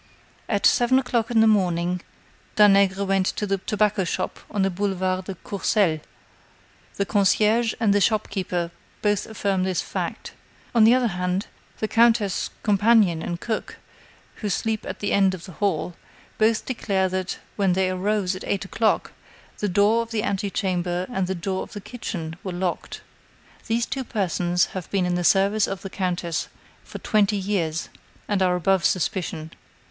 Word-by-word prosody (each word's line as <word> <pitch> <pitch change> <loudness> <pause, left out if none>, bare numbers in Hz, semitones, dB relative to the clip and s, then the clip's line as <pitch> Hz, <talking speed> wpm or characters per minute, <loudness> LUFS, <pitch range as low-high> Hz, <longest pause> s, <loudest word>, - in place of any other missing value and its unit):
At 205 -3 +1
seven 245 +2 +4
o'clock 245 -4 0
in 230 -2 +4
the - - +6
morning, 180 -4 +2 0.5
Danègre 200 -1 +5
went 195 -1 +1
to 210 - -1
the 195 -1 -1
tobacco 210 0 +1
shop 170 - -3
on 200 -2 0
the 195 - +1
Boulevard 185 -1 -1
de 195 - -5
Courcelles; 190 -3 0 1.0
the 200 - 0
concierge 215 +3 +2
and 215 -3 +3
the 205 - +3
shop 215 +1 +2
keeper 175 -3 -2 0.3
both 205 -1 +1
affirm 200 -3 -1
this 185 -1 0
fact. - - -4 0.4
On 230 -2 +6
the 235 +3 +7
other 250 -2 +2
hand, 180 +1 -1 0.3
the 215 - -1
countess' 225 -3 +3
companion 205 -5 +4
and 170 +1 -4
cook, 220 +1 -4 0.6
who 210 - -3
sleep 220 +3 -1
at - - -6
the 205 - -1
end 195 -1 +3
of 170 - -11
the 185 - -10
hall, 180 -2 -1 0.5
both 220 0 +2
declare 195 -6 0
that, 185 0 -3 0.2
when 195 -3 +2
they 185 0 +1
arose 190 0 0
at 185 - -8
eight 195 -1 -1
o'clock, 220 +2 0 0.5
the 205 - 0
door 205 +5 +3
of 230 - -6
the 220 -2 -1
antechamber 185 -4 -1
and 190 -4 0
the 190 - -2
door 190 +2 -2
of - - -8
the 205 - -5
kitchen 195 -7 -6
were 185 - -4
locked. 180 0 -3 0.7
These 230 +1 +1
two 270 - -3
persons 180 -5 0
have 185 -3 -6
been 195 -2 +1
in 180 - 0
the 175 0 0
service 200 +3 +3
of 195 - -5
the 195 - -6
countess 175 -3 -2 0.4
for - - -9
twenty 210 -1 +2
years, 180 -5 -1 0.4
and 205 -2 0
are 180 -1 +3
above 185 +1 +2
suspicion. 160 -3 -1
195 Hz, 170 wpm, -24 LUFS, 185-215 Hz, 1.0 s, the